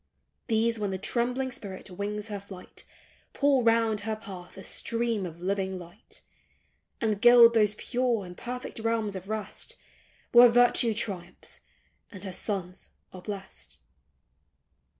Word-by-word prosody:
These, 225 0 +1
when 205 -1 -1
the 190 - -2
trembling 250 +6 -1
spirit 200 -6 -8
wings 205 +3 -4
her 205 -1 -4
flight 195 -2 -11 0.5
Pour 280 -2 +3
round 225 -2 +3
her 220 +1 -2
path 190 -5 -10
a 195 - -8
stream 230 -4 -1
of 170 +1 -11
living 190 0 -1
light; 175 +4 -12 0.8
And 215 -3 0
gild 240 -1 +8
those 210 -2 +3
pure 240 -3 0
and 180 0 -10
perfect 250 +2 -6
realms 225 -2 -1
of 190 +1 -7
rest, 215 -1 -4 0.6
Where 240 0 +9
virtue 240 -1 +4
triumphs, 185 -5 -5 0.5
and 190 -2 -10
her 190 -2 -6
sons 185 -2 -4 0.2
are 185 - -9
blest 190 - -8
210 Hz, 135 wpm, -28 LUFS, 190-235 Hz, 0.8 s, Where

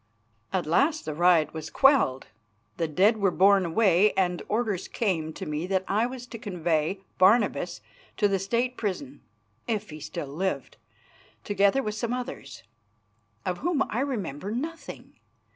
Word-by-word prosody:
At 185 -2 -1
last 280 - +2
the 155 - -3
riot 165 -2 +3
was 160 -1 -6
quelled; 265 - +3 0.5
the 165 - 0
dead 195 +9 +3
were 200 -2 +2
borne 195 0 +4
away, 195 +2 +4
and 180 -2 0
orders 215 -4 -1
came 170 -8 -1
to - - -7
me 150 +3 -3
that 190 -1 0
I 215 +4 +1
was 250 -1 -8
to 235 -2 -9
convey 175 -2 -1 0.2
Barnabas 205 +4 +3 0.4
to 205 - +3
the 195 -1 0
State 235 +6 -1
prison 230 +7 -4 0.5
if 215 -5 -2
he 155 - -8
still 145 -1 -6
lived, 190 +3 -3 0.7
together 200 +6 +2
with 210 - -2
some 235 +2 -2
others, 250 +1 -6 0.8
of 180 -1 -2
whom 320 -2 +1
I 230 - -1
remember 200 - -3
nothing. 310 +9 -6
200 Hz, 150 wpm, -27 LUFS, 175-235 Hz, 0.8 s, borne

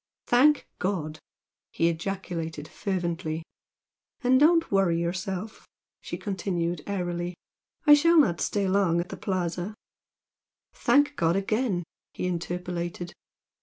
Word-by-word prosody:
"Thank 285 +5 +4
God!" 160 -5 -2 0.5
he 165 - +2
ejaculated 165 -3 -3
fervently. 170 -4 -3 0.8
"And 255 +1 +5
don't 330 +2 +4
worry 190 -4 +3
yourself" 185 +4 -4 0.3
she - - -5
continued, 175 -4 -2
airily 175 -3 -2 0.5
"I 295 - +9
shall 335 +3 +5
not 180 - +4
stay 200 -2 0
long 185 -3 +2
at 175 - -3
the - - -6
Plaza." 180 +1 -2 1.0
"Thank 290 0 +3
God 165 -1 +2
again!" 200 -1 0 0.3
he - - -3
interpolated. 175 0 -3
180 Hz, 110 wpm, -27 LUFS, 170-205 Hz, 1.0 s, I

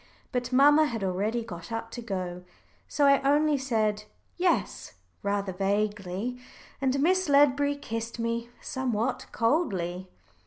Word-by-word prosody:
But 250 -2 -2
mamma 290 +4 +6
had 225 -6 -4
already 205 +5 -1
got 175 -3 -9
up 225 0 -4
to 240 - -6
go, 185 -5 -4 0.4
so 290 - +1
I 275 0 +5
only 295 +2 +3
said 215 -6 0 0.3
"Yes" 355 0 0 0.3
rather 200 -1 -1
vaguely, 205 +3 -1 0.4
and 270 0 +1
Miss 370 +1 +2
Ledbury 285 0 +4
kissed 230 -4 -5
me 230 0 -2
somewhat 250 -1 -2
coldly. 195 - 0
230 Hz, 125 wpm, -28 LUFS, 205-275 Hz, 0.4 s, mamma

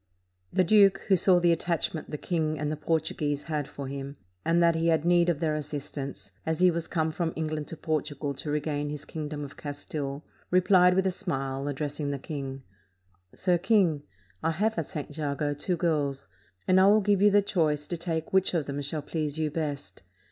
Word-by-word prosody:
The 185 - +3
duke, 195 +1 +5
who 195 - +6
saw 180 0 +5
the 175 -1 +4
attachment 165 -1 -1
the 150 - -4
king 155 -2 -1
and 150 +1 -2
the - - -1
Portuguese 150 -2 -1
had 150 -3 -2
for 140 -1 -7
him, 140 +1 -6 0.3
and 165 +1 +2
that 170 0 +5
he 165 +1 0
had 160 -1 +2
need 175 0 +4
of 165 -4 0
their 160 -2 0
assistance, 140 -8 -5
as 160 -1 -1
he 180 0 +6
was 165 -1 -2
come 160 -2 0
from 165 0 -2
England 155 -1 -3
to 165 - -7
Portugal 150 -2 -2
to 150 - -5
regain 145 0 -1
his 150 -1 -6
king 155 -2 -5
dom 145 -1 -5
of 145 - -9
Castile, 145 0 -5 0.2
replied 180 0 +5
with 190 0 +2
a 190 - +2
smile, 135 -7 -3
addressing 145 +1 -3
the 140 - -2
king: 135 -1 -6 0.7
"Sir 180 -2 +1
King, 185 -6 +3 0.4
I - - +1
have 210 +7 0
at 160 - -3
St. 145 -1 -6
Jago 145 -1 -1
two 170 +5 -2
girls, 145 - 0 0.4
and 185 0 +5
I 190 - +6
will 210 +2 +6
give 200 -1 +2
you 205 - +7
the 205 0 +4
choice 155 -7 +1
to 175 - -3
take 165 -1 -3
which 190 -1 +3
of 160 -4 0
them 140 +1 -4
shall 145 +1 -2
please 150 -1 -2
you 155 -1 0
best. 150 -3 -4
155 Hz, 205 wpm, -28 LUFS, 145-175 Hz, 0.7 s, you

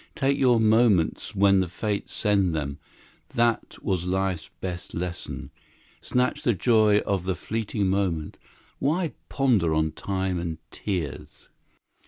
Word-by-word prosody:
Take 135 +1 +2
your 125 -4 +4
moments 110 -7 +3
when 100 0 +5
the 95 - +1
fates 100 +4 -3
send 100 -5 +1
them; 70 -2 -3 0.6
that 120 -1 +1
was 95 -4 0
life's 95 -2 -1
best 90 -2 -5
lesson. 90 0 -5 0.5
Snatch 125 0 0
the 120 - +2
joy 110 0 +4
of 95 -3 -1
the 95 -1 0
fleeting 105 +2 -2
moment. 95 -5 -1 0.4
Why 160 +4 0 0.2
ponder 110 - +2
on 80 0 +1
time 95 -1 -2
and 85 -2 -3
tears? 90 -9 -5
95 Hz, 130 wpm, -26 LUFS, 90-110 Hz, 0.6 s, when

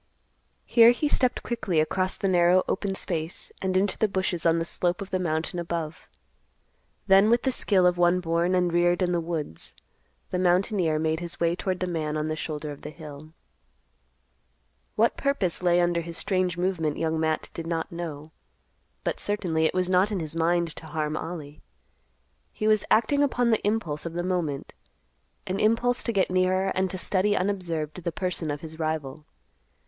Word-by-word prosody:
Here 230 -1 +7
he 245 +5 +2
stepped 255 -3 +1
quickly 215 -9 -1
across 185 +4 0
the 195 - -1
narrow 180 0 +4
open 195 0 -1
space 165 -3 -4
and 185 -1 +1
into 195 +1 0
the 215 - +3
bushes 185 -3 -1
on 165 0 +4
the 165 - -1
slope 175 +1 -1
of 200 0 -7
the 185 - 0
mountain 165 0 -1
above. 170 -1 -4 1.0
Then 195 +2 +6
with 235 +1 +3
the 265 - +2
skill 195 -6 +2
of 180 0 +3
one 175 +1 +4
born 170 +1 +1
and 180 -2 +1
reared 175 +1 +3
in 180 - +1
the 175 -1 +1
woods, 160 - -5 0.6
the 180 - -1
mountaineer 180 -2 +2
made 160 0 0
his 175 -1 -3
way 170 0 +2
toward 185 0 -3
the - - +1
man 155 -4 -2
on 155 +1 -2
the 155 - -1
shoulder 150 -1 -5
of 145 - -10
the 150 - -7
hill. 155 0 -11 1.6
What 230 +2 +2
purpose 245 -13 0
lay 175 -1 +3
under 175 -1 +2
his 170 0 -7
strange 185 -3 0
movement 175 -4 -1
Young 160 0 -1
Matt 160 -1 -1
did 165 -1 -6
not 165 -1 -2
know. 160 -3 -6 0.7
But - - -2
certainly 175 -6 0
it - - +1
was 185 -1 +1
not 185 +3 +3
in 200 - -1
his 160 -1 -4
mind 170 0 +1
to 160 - -8
harm 155 0 -2
Ollie. 155 -3 -6 0.9
He 215 - -2
was 215 -1 +3
acting 240 +6 +3
upon 245 -4 +2
the 220 - +2
impulse 185 -8 -1
of 165 - -7
the 175 +1 -2
moment; 175 -6 -2 0.7
an 190 +1 -2
impulse 235 +3 +2
to 235 - 0
get 195 -4 +1
nearer 185 +1 +2
and 190 0 0
to 185 - -4
study 195 +2 +1
unobserved 180 -4 -2
the 170 - -1
person 180 -2 -2
of 145 0 -3
his 160 0 -9
rival. 155 -2 -3
175 Hz, 185 wpm, -26 LUFS, 160-190 Hz, 1.6 s, Here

